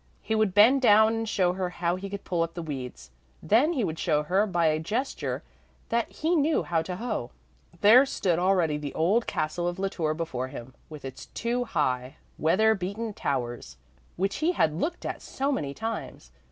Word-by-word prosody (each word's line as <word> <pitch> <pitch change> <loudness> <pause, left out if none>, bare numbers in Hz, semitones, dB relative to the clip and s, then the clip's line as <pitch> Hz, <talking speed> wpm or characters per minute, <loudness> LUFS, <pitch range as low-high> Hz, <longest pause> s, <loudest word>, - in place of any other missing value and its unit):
He 220 - -2
would 215 -4 +1
bend 240 +7 +6
down 220 -2 +6
and 225 -1 -2
show 180 -4 +2
her 185 -1 -2
how 175 0 -1
he 195 +2 -6
could 200 0 -6
pull 175 -2 -1
up 165 0 -2
the 170 - -4
weeds; 125 - -7 0.3
then 240 - +3
he 260 -8 0
would 160 -4 -3
show 150 -3 +1
her 190 +7 +2
by 175 -4 +1
a 155 0 +2
gesture 225 - -3 0.5
that 235 0 0
he 325 +3 0
knew 310 0 +2
how 165 -2 0
to 180 +3 -5
hoe. 210 - -3 0.5
There 245 +7 +7
stood 175 -9 0
already 175 -5 +2
the 145 -2 -6
old 195 +9 +2
castle 175 +3 -1
of 175 +1 -3
La 195 0 -1
Tour 155 -5 -1
before 130 -6 -3
him, 130 0 -9 0.2
with 150 -3 -9
its 130 0 -8
two 245 +1 -1
high, 130 - -1 0.2
weather 205 +8 +4
beaten 205 +3 -4
towers, 120 - -3 0.4
which 195 +2 -1
he 330 +4 +1
had 160 - +2
looked 310 - -3
at - - -4
so 275 +2 -2
many 145 - -2
times. 225 +9 -6
185 Hz, 195 wpm, -27 LUFS, 155-225 Hz, 0.5 s, There